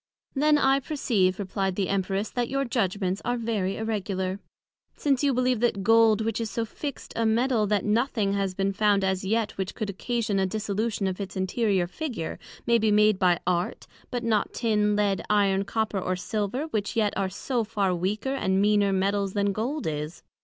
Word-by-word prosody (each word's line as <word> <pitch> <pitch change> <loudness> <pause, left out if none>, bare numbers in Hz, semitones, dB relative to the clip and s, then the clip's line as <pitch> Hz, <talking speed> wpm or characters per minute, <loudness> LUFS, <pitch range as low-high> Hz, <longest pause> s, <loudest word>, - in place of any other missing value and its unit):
Then 300 +2 +4
I 270 -1 +3
perceive, 225 - 0
replyed 195 -1 -2
the 195 -1 0
Empress, 195 +1 -1
that 245 -1 -1
your 275 0 0
judgments 195 -5 -1
are 245 0 0
very 215 -5 -1
irregular, 195 -3 -2 0.6
since 275 -2 +1
you 285 - +4
believe 255 -2 +1
that 220 -4 +1
Gold, 225 0 +5
which 225 +1 -1
is 225 - -2
so 225 +3 -2
fixt 280 +5 -7
a 230 - 0
Metal, 225 0 +2
that 210 0 +1
nothing 215 -2 +1
has 195 -2 -1
been 195 +1 0
found 205 0 +2
as 190 0 0
yet 215 +2 0
which 190 -1 -3
could 215 -3 -3
occasion 215 0 -1
a 190 - +2
dissolution 215 +1 -2
of 190 +1 -2
its 195 - -6
interior 190 0 +1
figure, 225 - -5 0.3
may 235 0 +4
be 220 0 +2
made 210 -1 +4
by 180 -2 +4
Art, 175 0 -1 0.3
and 245 -1 -2
not 215 -3 +1
Tin, 210 -3 +2
Lead, 205 -2 +1
Iron, 200 -2 +3
Copper 215 0 -1
or 185 0 -1
Silver, 210 +7 -2
which 215 -3 -2
yet 215 -3 +2
are 195 -1 0
so 235 +5 -2
far 205 -4 0
weaker, 205 +9 -1
and 190 -8 +1
meaner 205 0 +3
Metals 195 0 0
then 200 -1 +1
Gold 250 +9 -3
is. 150 +1 -4
210 Hz, 190 wpm, -26 LUFS, 195-230 Hz, 0.6 s, Gold